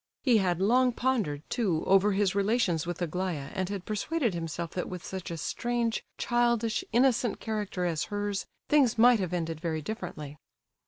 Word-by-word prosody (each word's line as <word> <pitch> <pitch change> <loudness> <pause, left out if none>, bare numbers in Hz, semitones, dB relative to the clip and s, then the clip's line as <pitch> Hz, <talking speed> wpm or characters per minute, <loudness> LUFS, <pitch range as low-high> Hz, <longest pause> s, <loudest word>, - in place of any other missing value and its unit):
He 240 -5 +5
had 180 -3 +1
long 245 +5 +3
pondered, 215 - -1
too, 185 -10 0
over 195 +2 +4
his 195 -1 +2
relations 200 -5 +1
with 175 0 -3
Aglaya, 170 -4 -3
and 190 -2 -2
had 200 -3 -5
persuaded 235 - -1
himself 165 0 -4
that 180 - -3
with 180 -2 -7
such 190 -2 -5
a 170 - -4
strange, 235 +6 -1
childish, 235 -2 +1
innocent 240 -1 +2
character 210 -5 -3
as 165 -3 -1
hers, 205 -1 -3 0.2
things 270 -6 +4
might 240 0 +6
have 185 -3 -2
ended 165 -3 -3
very 160 -3 -2
differently. 155 -8 -6
195 Hz, 165 wpm, -29 LUFS, 175-235 Hz, 0.2 s, might